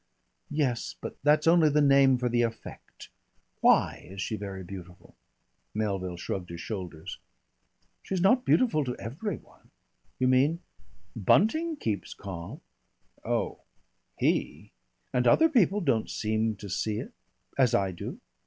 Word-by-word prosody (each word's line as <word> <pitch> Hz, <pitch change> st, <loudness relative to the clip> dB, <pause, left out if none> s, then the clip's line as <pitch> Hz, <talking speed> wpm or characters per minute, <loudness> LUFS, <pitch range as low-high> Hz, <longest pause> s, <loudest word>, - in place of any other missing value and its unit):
"Yes, 140 Hz, -6 st, -1 dB
but -, -, -6 dB
that's 150 Hz, +2 st, +3 dB
only 165 Hz, -2 st, +5 dB
the 150 Hz, +1 st, +2 dB
name 140 Hz, -2 st, +5 dB
for 125 Hz, 0 st, -1 dB
the 120 Hz, 0 st, +2 dB
effect. 115 Hz, -1 st, -6 dB, 0.5 s
Why -, -, +3 dB
is 95 Hz, +1 st, -9 dB
she 110 Hz, -, -2 dB
very 100 Hz, -2 st, -6 dB
beautiful?" 90 Hz, -1 st, -11 dB, 0.6 s
Melville 95 Hz, -4 st, -2 dB
shrugged 90 Hz, +1 st, -4 dB
his 85 Hz, 0 st, -7 dB
shoulders. 90 Hz, -5 st, -6 dB, 0.8 s
"She's 190 Hz, -, -3 dB
not 225 Hz, +8 st, +4 dB
beautiful 225 Hz, -, +3 dB
to 125 Hz, -2 st, -3 dB
every 150 Hz, -, -4 dB
one." -, -, -22 dB, 0.5 s
"You 130 Hz, -, +2 dB
mean?" 140 Hz, +7 st, +3 dB, 0.5 s
"Bunting 270 Hz, -, +3 dB
keeps 110 Hz, -, -3 dB
calm." 100 Hz, -, -8 dB, 0.6 s
"Oh -, -, -1 dB, 0.6 s
he -, -, -1 dB, 0.2 s
!" -, -, -46 dB
"And 125 Hz, 0 st, +2 dB
other 325 Hz, -, +6 dB
people 210 Hz, -, +3 dB
don't 130 Hz, -, +1 dB
seem 110 Hz, 0 st, -1 dB
to 100 Hz, +1 st, -9 dB
see 105 Hz, +3 st, -2 dB
it -, -, -6 dB, 0.5 s
as 125 Hz, -4 st, +4 dB
I 95 Hz, -1 st, +1 dB
do." 85 Hz, -, -7 dB
120 Hz, 140 wpm, -28 LUFS, 100-155 Hz, 0.8 s, other